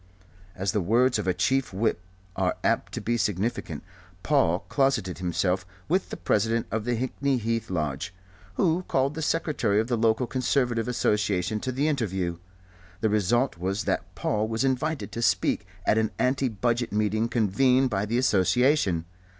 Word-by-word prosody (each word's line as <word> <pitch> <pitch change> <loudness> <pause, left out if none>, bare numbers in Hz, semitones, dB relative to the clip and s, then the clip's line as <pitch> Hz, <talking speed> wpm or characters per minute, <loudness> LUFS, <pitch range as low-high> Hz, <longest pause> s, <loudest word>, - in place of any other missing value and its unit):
As 95 +1 -1
the 105 - 0
words 115 +6 +3
of 105 - -3
a - - +4
Chief 130 +8 +1
Whip 100 -1 0 0.3
are - - 0
apt - - +1
to - - -4
be 120 +1 0
significant, 105 -6 -2 0.4
Paul 115 - +2
closeted 130 -11 0
himself 90 +1 0 0.2
with 185 +4 0
the - - -6
President 115 +2 +1
of 110 0 -2
the 120 0 0
Hickney 130 +2 0
Heath 115 0 -2
Lodge, 75 -2 -2 0.4
who 170 - +2
called 135 +2 +1
the 160 - -5
Secretary 150 -10 +1
of 110 +3 -1
the 120 - +2
local 115 +2 +2
Conservative 125 -2 0
Association 105 -4 0
to 130 - -3
the 140 +4 0
interview. 95 - -1 0.6
The 110 - +2
result 110 +2 +1
was 95 +3 -1
that - - -2
Paul 105 +1 0
was 110 +2 -1
invited 135 +4 -1
to 115 - -4
speak 95 0 +1 0.2
at 110 - +3
an 110 -1 +1
anti 130 +1 +1
Budget 120 +2 -1
meeting 110 +2 0
convened 125 +4 +2
by 100 0 -1
the 115 +3 0
Association. 105 - +2
115 Hz, 165 wpm, -26 LUFS, 100-130 Hz, 0.6 s, a